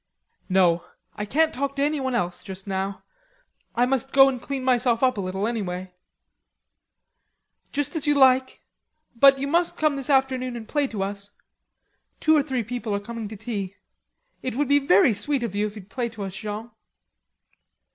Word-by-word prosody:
"No, 175 -2 +3 0.3
I 210 - -4
can't 315 +8 +2
talk 275 +1 -2
to 280 - 0
anyone 280 -4 0
else 190 0 -4
now. 195 0 -3 0.7
I 245 - +3
must 265 +1 -1
go 270 0 +7
and 255 -3 -4
clean 275 -1 -4
myself 245 -1 +2
up 255 -1 +4
a 200 - -3
little 190 +2 -2
anyway." 185 -5 -3 1.8
"Just 290 +4 -2
as 310 -2 -2
you 295 - +4
like.... 260 -1 +4 0.5
But 275 +3 +7
you 275 +1 -3
must 340 +4 +1
come 305 -2 +1
this 275 0 -4
afternoon 260 -2 +1
and 225 -2 -7
play 290 -2 0
to 210 -6 -3
us. 200 +1 -6 0.9
Two 315 0 +4
or 300 - +5
three 265 -4 -2
people 230 -2 -3
are - - -1
coming 230 +1 -6
to 215 +1 -9
tea.... 200 -3 -4 0.7
It 255 -2 -4
would 285 +1 0
be 285 0 +5
very 220 -4 +4
sweet 270 +5 -1
of 230 -5 -3
you, 205 +1 0
if 210 - -10
you'd 205 -1 -12
play 245 -2 -2
to 220 -3 -7
us, 190 -1 -6
Jean." 215 +3 -6
240 Hz, 175 wpm, -24 LUFS, 200-270 Hz, 1.8 s, go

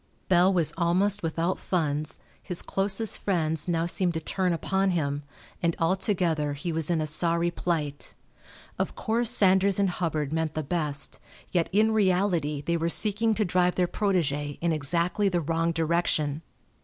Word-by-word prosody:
Bell 180 +1 +5
was 175 -5 +2
almost 185 +4 +1
without 165 +2 -1
funds, 155 -4 -1 0.2
his 180 - 0
closest 195 +3 +1
friends 160 -5 -1
now 165 -1 0
seemed 175 0 +1
to - - 0
turn 180 +3 -1
upon 190 +3 0
him, 145 -5 -1 0.4
and 170 -2 +1
altogether 165 -4 0
he 145 +5 -4
was 160 0 -1
in 165 -2 +1
a - - -1
sorry 170 +2 0
plight. 155 -5 -3 0.6
Of - - -2
course 230 +1 +2
Sanders 190 0 +4
and 200 -2 +2
Hubbard 155 -5 -2
meant 160 -1 -1
the 155 - -2
best, 145 -2 -1 0.3
yet 170 -3 +1
in 215 +3 +3
reality 180 -8 +1
they 170 +3 -1
were 165 +1 -1
seeking 215 +4 +2
to 215 - +1
drive 180 0 +1
their 180 -1 +1
protégé 150 -8 -1
in 170 0 0
exactly 170 +6 0
the 180 -2 0
wrong 165 +1 0
direction. 160 -2 0
170 Hz, 160 wpm, -27 LUFS, 155-190 Hz, 0.6 s, Bell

